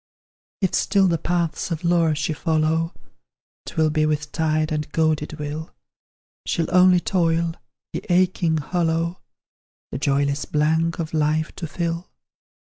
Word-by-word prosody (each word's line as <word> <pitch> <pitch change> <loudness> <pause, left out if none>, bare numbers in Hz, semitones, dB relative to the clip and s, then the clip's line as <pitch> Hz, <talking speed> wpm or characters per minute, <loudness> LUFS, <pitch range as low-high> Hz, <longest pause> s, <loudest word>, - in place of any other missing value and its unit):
If 190 - +1
still 195 -2 +3
the 165 -2 +1
paths 170 -1 -1
of 165 0 -3
lore 170 -2 +3
she 155 +1 -1
follow, 160 +1 0 0.8
'Twill 160 -2 +1
be 155 0 +2
with 150 -1 -2
tired 155 -1 0
and 150 -1 -2
goaded 155 -1 +1
will; 150 +1 -6 0.7
She'll 170 +1 -1
only 180 0 +6
toil, 170 -2 +1 0.4
the - - -4
aching 175 -2 +2
hollow, 165 +2 -1 0.7
The - - -4
joyless 140 0 +1
blank 160 +2 +1
of 160 -1 -4
life 155 +1 +1
to 170 - -5
fill. 170 +2 -3
160 Hz, 135 wpm, -23 LUFS, 155-170 Hz, 0.8 s, only